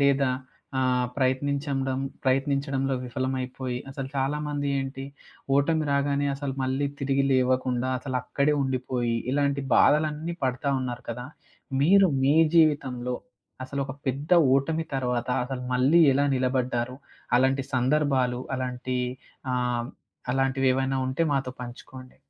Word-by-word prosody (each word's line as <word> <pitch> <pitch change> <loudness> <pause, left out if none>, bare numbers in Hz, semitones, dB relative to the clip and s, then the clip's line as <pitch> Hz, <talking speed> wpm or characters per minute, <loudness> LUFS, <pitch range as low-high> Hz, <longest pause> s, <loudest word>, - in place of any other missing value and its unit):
లేదా 140 -1 +3 0.5
ఆహ్, 125 -1 +2
ప్రయత్నించండం 135 0 0 0.3
ప్రయత్నించడంలో 135 0 +1
విఫలమైపోయి, 130 0 -3
అసలు 135 -1 -5
చాలామంది 145 +1 -1
ఏంటి, 135 0 -4 0.5
ఓటమి 155 +2 +2
రాగానే 140 0 +1
అసల 140 -1 -4
మళ్ళీ 130 +2 0
తిరిగి 135 0 +1
లేవకుండా 130 -1 +1
అసలక్కడే 140 +3 0
ఉండిపోయి, 125 -2 -1 0.2
ఇలాంటి 140 0 +1
బాధలన్నీ 155 +2 +3
పడతా 130 +2 0
ఉన్నారు 125 -1 -5
కదా! 125 +2 -5 0.6
మీరు 195 +5 +6 0.2
మీ 140 +2 +4 0.2
జీవితంలో 130 -6 +2 0.5
అసలొక 135 0 -3 0.2
పెద్ద 140 +5 -3 0.3
ఓటమి 160 +4 -1
తర్వాత, 125 -2 -1 0.2
అసలు 125 -1 -5
మళ్ళీ 135 +7 +4
ఎలా 140 +1 +2
నిలబడ్డారు? 125 -1 -1 0.4
అలాంటి 135 +1 +2
సందర్భాలు, 130 -1 +1 0.2
అలాంటి 125 0 -3 0.6
ఆహ్, 125 -1 -1 0.4
అలాంటివేవైనా 135 0 +1
ఉంటే 135 +6 0
మాతో 135 -2 -1
పంచుకోండి. 125 +1 -10
135 Hz, 110 wpm, -26 LUFS, 130-140 Hz, 0.6 s, మీరు